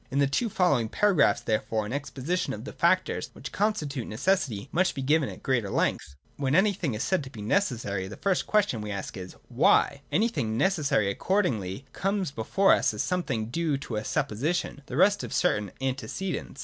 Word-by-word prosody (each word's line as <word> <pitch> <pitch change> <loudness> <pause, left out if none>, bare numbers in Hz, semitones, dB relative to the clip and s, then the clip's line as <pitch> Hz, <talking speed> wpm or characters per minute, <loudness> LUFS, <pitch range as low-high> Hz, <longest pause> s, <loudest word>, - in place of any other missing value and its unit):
In 135 - -3
the 140 - +4
two 180 - 0
following 140 - +2
paragraphs 180 - +3
therefore 110 -1 -1
an 105 - -5
exposition 145 +5 -2
of - - -7
the - - -7
factors - - +1
which - - -8
constitute 150 - -1
necessity 120 - 0
must 185 +2 +1
be 135 - -3
given 150 +1 +2
at - - -10
greater 120 -6 0
length. 70 - -1 0.2
When 140 0 0
anything 185 - +2
is 105 - -2
said 190 -5 +1
to 135 - -8
be 110 -6 -9
necessary, 110 - 0
the 105 - -9
first 195 -2 0
question 205 - +2
we 105 - -5
ask 100 -2 -5
is, 90 -2 -8
Why 140 - +3
1 - - -17
Anything 140 - +1
necessary 145 - +2
accordingly 125 - -1
comes 195 -4 -1
before 165 - +3
us - - +2
as - - -1
something 130 -12 -2
due 160 -1 0
to 130 -4 -6
a 105 - -2
supposition, 145 +10 -1
the 130 - -5
result 200 +4 +4
of - - -5
certain 105 - +1
antecedents. 135 +4 -4
140 Hz, 190 wpm, -27 LUFS, 110-185 Hz, 0.2 s, the